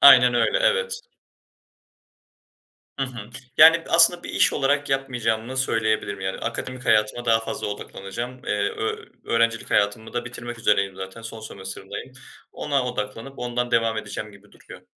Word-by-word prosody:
Aynen 125 Hz, -3 st, +9 dB
öyle, -, -, +3 dB
evet. 485 Hz, -1 st, +1 dB, 2.0 s
Hı 135 Hz, -, +1 dB
hı. 120 Hz, -4 st, -9 dB, 0.3 s
Yani 165 Hz, +1 st, +8 dB
aslında 170 Hz, +1 st, +5 dB
bir -, -, -8 dB
iş -, -, +3 dB
olarak 145 Hz, 0 st, +1 dB
yapmayacağımı 125 Hz, -2 st, -1 dB
söyleyebilirim. 110 Hz, -5 st, 0 dB
Yani, 95 Hz, 0 st, -3 dB
akademik 125 Hz, +2 st, -5 dB
hayatıma 105 Hz, +3 st, +2 dB
daha 115 Hz, -1 st, +4 dB
fazla -, -, -4 dB
odaklanacağım. 105 Hz, +4 st, -6 dB
Eee, -, -, 0 dB
ö 435 Hz, +1 st, -3 dB, 0.2 s
öğrencilik 115 Hz, 0 st, +1 dB
hayatımı 105 Hz, +2 st, +1 dB
da 120 Hz, 0 st, -2 dB
bitirmek 120 Hz, 0 st, -7 dB
üzereyim 100 Hz, -3 st, +1 dB
zaten. 95 Hz, +4 st, -8 dB
Son 115 Hz, 0 st, -8 dB
sömestiririmdeyim. 100 Hz, +3 st, -8 dB, 0.4 s
Ona 140 Hz, -3 st, -1 dB
odaklanıp 120 Hz, +2 st, -5 dB
ondan 120 Hz, 0 st, -2 dB
devam 115 Hz, -1 st, +2 dB
edeceğim 105 Hz, 0 st, -6 dB
gibi 100 Hz, +1 st, -19 dB
duruyor. -, -, -14 dB
120 Hz, 140 wpm, -24 LUFS, 110-135 Hz, 2.0 s, Aynen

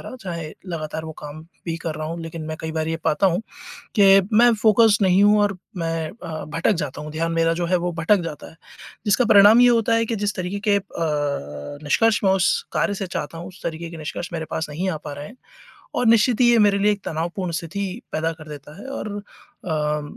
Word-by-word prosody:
रहा 255 Hz, -, -8 dB
चाहे 170 Hz, -5 st, -5 dB, 0.2 s
लगातार 160 Hz, -2 st, -5 dB
वो 160 Hz, -, -6 dB
काम 150 Hz, +1 st, -8 dB, 0.2 s
भी 165 Hz, -1 st, -2 dB
कर 160 Hz, -2 st, -2 dB
रहा 155 Hz, 0 st, -4 dB
हूँ 165 Hz, +1 st, -5 dB
लेक़िन 165 Hz, 0 st, -6 dB
मैं 155 Hz, 0 st, -4 dB
कई 160 Hz, 0 st, -4 dB
बार 160 Hz, 0 st, -2 dB
ये 165 Hz, -, -1 dB
पाता 155 Hz, +6 st, +2 dB
हूँ 180 Hz, +2 st, +1 dB, 0.6 s
कि 195 Hz, 0 st, +7 dB
मैं 240 Hz, +1 st, +6 dB
फ़ोकसड 220 Hz, -1 st, +5 dB
नहीं 185 Hz, +2 st, +4 dB
हूँ 210 Hz, +1 st, +5 dB
और 200 Hz, -2 st, 0 dB, 0.2 s
मैं 165 Hz, -1 st, -2 dB
अ, 160 Hz, -2 st, -5 dB
भटक 165 Hz, +7 st, 0 dB
जाता 150 Hz, -5 st, -4 dB
हूँ। 150 Hz, 0 st, -7 dB
ध्यान 165 Hz, +2 st, -2 dB
मेरा 165 Hz, 0 st, +2 dB
जो 175 Hz, +1 st, -2 dB
है 180 Hz, -, +1 dB
वो 175 Hz, +1 st, -2 dB
भटक 165 Hz, +5 st, +2 dB
जाता 165 Hz, -3 st, -7 dB
है। -, -, -18 dB, 0.5 s
जिसका 210 Hz, +4 st, +3 dB
परिणाम 210 Hz, +2 st, +7 dB
ये 245 Hz, -, +7 dB
होता 230 Hz, -1 st, +2 dB
है 230 Hz, -, +2 dB
कि 225 Hz, 0 st, -2 dB
जिस 205 Hz, 0 st, -2 dB
तरीक़े 185 Hz, +2 st, -3 dB
के 205 Hz, -, +5 dB
अ, -, -, -2 dB, 1.0 s
निष्कर्ष 215 Hz, +8 st, +3 dB
मैं 190 Hz, -, +4 dB
उस 190 Hz, -2 st, +2 dB
कार्य 205 Hz, -, +1 dB
से 195 Hz, -1 st, -4 dB
चाहता 165 Hz, -2 st, -5 dB
हूँ, 170 Hz, -, -7 dB
उस 185 Hz, 0 st, -14 dB
तरीक़े 165 Hz, 0 st, -4 dB
के 165 Hz, -, -8 dB
निष्कर्ष 160 Hz, +3 st, -5 dB
मेरे 160 Hz, -1 st, -3 dB
पास 160 Hz, -1 st, -3 dB
नहीं 175 Hz, +6 st, -2 dB
आ 165 Hz, -, -2 dB
पा 150 Hz, -1 st, -8 dB
रहे 145 Hz, +1 st, -7 dB
हैं 235 Hz, -, -13 dB, 0.6 s
और 245 Hz, -, +1 dB
निश्चित 230 Hz, +1 st, +4 dB
ही 240 Hz, -, +6 dB
ये 235 Hz, -, +5 dB
मेरे 205 Hz, -1 st, +4 dB
लिए 210 Hz, +1 st, +4 dB
एक 205 Hz, -1 st, -3 dB
तनावपूर्ण 170 Hz, +3 st, -3 dB
स्थिति 165 Hz, +5 st, -4 dB, 0.3 s
पैदा 160 Hz, +1 st, -1 dB
कर 155 Hz, -1 st, -13 dB
देता 150 Hz, +2 st, -10 dB
है 215 Hz, -, -10 dB
और 215 Hz, -, -5 dB
अ, 150 Hz, -6 st, -4 dB
170 Hz, 230 wpm, -22 LUFS, 160-205 Hz, 1.0 s, कि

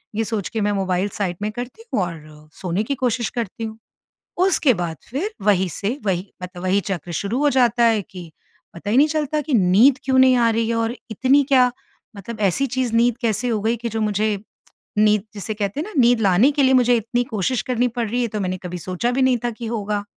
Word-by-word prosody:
ये 225 Hz, -, +1 dB
सोच 215 Hz, -3 st, -3 dB
के 225 Hz, -2 st, -3 dB
मैं 205 Hz, 0 st, +1 dB
मोबाइल 190 Hz, 0 st, 0 dB
साइड 180 Hz, -4 st, -1 dB
में 210 Hz, +1 st, -2 dB
करती 245 Hz, -, -8 dB
हूँ -, -, +2 dB
और 155 Hz, -3 st, -9 dB
सोने 185 Hz, +2 st, -1 dB
की 280 Hz, +5 st, -2 dB
कोशिश 245 Hz, -2 st, -1 dB
करती 225 Hz, 0 st, -5 dB
हूँ। 220 Hz, 0 st, -5 dB, 0.7 s
उसके 315 Hz, -8 st, +3 dB
बाद 170 Hz, -3 st, -4 dB
फ़िर 295 Hz, -, -2 dB, 0.2 s
वही 190 Hz, -3 st, +3 dB
से 205 Hz, -, -3 dB
वही 190 Hz, 0 st, -2 dB
मतलब 180 Hz, 0 st, -8 dB
वही 185 Hz, +2 st, +2 dB
चक्र 175 Hz, -2 st, -4 dB
शुरू 210 Hz, +6 st, -2 dB
हो 295 Hz, 0 st, +3 dB
जाता 240 Hz, -1 st, +3 dB
है 225 Hz, -2 st, +3 dB
कि 175 Hz, -3 st, -10 dB, 0.4 s
पता 170 Hz, +4 st, -7 dB
ही 225 Hz, -, +2 dB
नहीं 290 Hz, +3 st, +6 dB
चलता 305 Hz, -1 st, -1 dB
कि 295 Hz, 0 st, -4 dB
नींद 220 Hz, +6 st, +5 dB
क्यों 260 Hz, 0 st, +1 dB
नहीं 260 Hz, 0 st, +6 dB
आ 235 Hz, -1 st, +3 dB
रही 225 Hz, 0 st, 0 dB
है 230 Hz, -, 0 dB
और 230 Hz, +1 st, -1 dB, 0.2 s
इतनी 265 Hz, +6 st, +3 dB
क्या 255 Hz, -2 st, +5 dB, 0.5 s
मतलब 215 Hz, +3 st, -8 dB
ऐसी 200 Hz, +7 st, +2 dB
चीज़ 250 Hz, -2 st, -2 dB
नींद 235 Hz, 0 st, +3 dB
कैसे 235 Hz, +1 st, 0 dB
हो 220 Hz, -2 st, 0 dB
गई 225 Hz, +3 st, +1 dB
कि 235 Hz, +1 st, -4 dB
जो 225 Hz, 0 st, -3 dB
मुझे 210 Hz, 0 st, 0 dB, 0.6 s
नींद 210 Hz, -1 st, +4 dB
जिसे 210 Hz, +1 st, -4 dB
कहते 205 Hz, +4 st, -3 dB
हैं 320 Hz, -, -3 dB
न 395 Hz, -10 st, -2 dB
नींद 240 Hz, 0 st, +4 dB
लाने 200 Hz, +6 st, +4 dB
के 285 Hz, -1 st, +1 dB
लिए 265 Hz, 0 st, +4 dB
मुझे 245 Hz, -1 st, +4 dB
इतनी 230 Hz, +2 st, -1 dB
कोशिश 230 Hz, +2 st, -1 dB
करनी 250 Hz, -1 st, 0 dB
पड़ 235 Hz, -1 st, -3 dB
रही 245 Hz, +3 st, -1 dB
है, 240 Hz, -, 0 dB
तो 215 Hz, -1 st, -4 dB
मैंने 185 Hz, -1 st, -2 dB
कभी 180 Hz, 0 st, -5 dB
सोचा 185 Hz, +7 st, -2 dB
भी 260 Hz, +2 st, 0 dB
नहीं 260 Hz, -1 st, +3 dB
था -, -, +1 dB
कि 235 Hz, +1 st, -8 dB
होगा। 210 Hz, -2 st, -2 dB
225 Hz, 230 wpm, -21 LUFS, 195-250 Hz, 0.7 s, नहीं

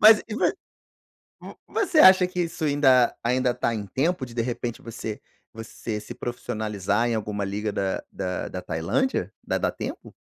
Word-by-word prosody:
Mas 215 Hz, 0 st, +8 dB
e 215 Hz, -, -4 dB
vo -, -, 0 dB, 1.0 s
hã, -, -, -9 dB
você 380 Hz, -7 st, +1 dB
acha 185 Hz, -6 st, +8 dB
que 180 Hz, 0 st, -3 dB
isso 170 Hz, -1 st, -4 dB
ainda 135 Hz, -4 st, +4 dB
ainda 125 Hz, +1 st, +1 dB
tá 115 Hz, -, 0 dB
em 105 Hz, -2 st, -4 dB
tempo 135 Hz, -, 0 dB
de 115 Hz, -, -12 dB
de 115 Hz, -, 0 dB
repente 120 Hz, -1 st, -4 dB
você 110 Hz, -2 st, -6 dB, 0.3 s
você 115 Hz, -1 st, -6 dB
se 105 Hz, -, -9 dB
profissionalizar 110 Hz, -2 st, -2 dB
em 120 Hz, -, 0 dB
alguma 105 Hz, -2 st, -2 dB
liga 105 Hz, +2 st, -2 dB
da 95 Hz, -1 st, -1 dB
da 90 Hz, 0 st, -3 dB
da 90 Hz, -, -6 dB
Tailândia? 85 Hz, -, -1 dB
Dá -, -, -1 dB
dá -, -, +1 dB
tempo? -, -, -7 dB
120 Hz, 175 wpm, -25 LUFS, 105-150 Hz, 1.0 s, Mas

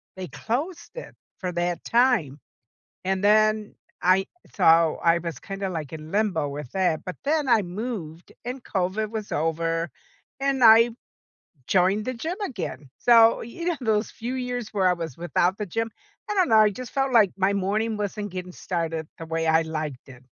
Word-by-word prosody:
they 185 Hz, -1 st, -6 dB
closed 320 Hz, +10 st, -4 dB
it -, -, -9 dB, 0.2 s
for 180 Hz, -1 st, -3 dB
that 175 Hz, 0 st, -2 dB
time. 230 Hz, -, +2 dB, 0.6 s
And 190 Hz, +1 st, -1 dB
then 215 Hz, 0 st, +3 dB, 0.3 s
I 185 Hz, +2 st, +4 dB, 0.3 s
so, 165 Hz, -3 st, +4 dB
I 170 Hz, 0 st, +5 dB
was 170 Hz, -1 st, -5 dB
kinda 195 Hz, -1 st, -5 dB
like 160 Hz, -5 st, -5 dB
in 155 Hz, 0 st, -8 dB
limbo 195 Hz, -8 st, +1 dB
with 140 Hz, -2 st, -7 dB
that, 180 Hz, -5 st, +1 dB
but 185 Hz, -, -5 dB
then 300 Hz, 0 st, +1 dB
I 230 Hz, -2 st, +5 dB
moved 180 Hz, -4 st, -6 dB
and 250 Hz, +1 st, -5 dB
COVID 195 Hz, +3 st, -1 dB
was 220 Hz, -2 st, -5 dB
over, 165 Hz, +1 st, -1 dB, 0.5 s
and 270 Hz, -2 st, +1 dB
I 230 Hz, +1 st, +8 dB, 0.8 s
joined 195 Hz, +3 st, +2 dB
the 255 Hz, -, -2 dB
gym 325 Hz, +10 st, -4 dB
again. 180 Hz, -, -6 dB
So, 230 Hz, -1 st, +6 dB
you 335 Hz, +9 st, -7 dB
know, 340 Hz, -4 st, 0 dB
those 220 Hz, -2 st, 0 dB
few 245 Hz, +3 st, -5 dB
years 250 Hz, -3 st, -3 dB
where 190 Hz, -2 st, +2 dB
I 180 Hz, -, +3 dB
was 165 Hz, -5 st, -6 dB
without 175 Hz, +2 st, +1 dB
the 210 Hz, -, -3 dB
gym, 225 Hz, +5 st, -2 dB, 0.4 s
I -, -, 0 dB
don't 370 Hz, -2 st, +3 dB
know, 220 Hz, -, +6 dB
I 215 Hz, -1 st, +6 dB
just 250 Hz, +4 st, -8 dB
felt 270 Hz, -1 st, 0 dB
like 210 Hz, -5 st, +5 dB
my 195 Hz, +1 st, +2 dB
morning 210 Hz, +3 st, 0 dB
wasn't 205 Hz, -1 st, -4 dB
getting 180 Hz, -1 st, -6 dB
started 165 Hz, -4 st, -3 dB
the 165 Hz, -, -7 dB
way 165 Hz, 0 st, -2 dB
I 160 Hz, +1 st, +4 dB
liked 155 Hz, -5 st, -5 dB
it. 130 Hz, 0 st, -14 dB
195 Hz, 180 wpm, -25 LUFS, 165-230 Hz, 0.8 s, I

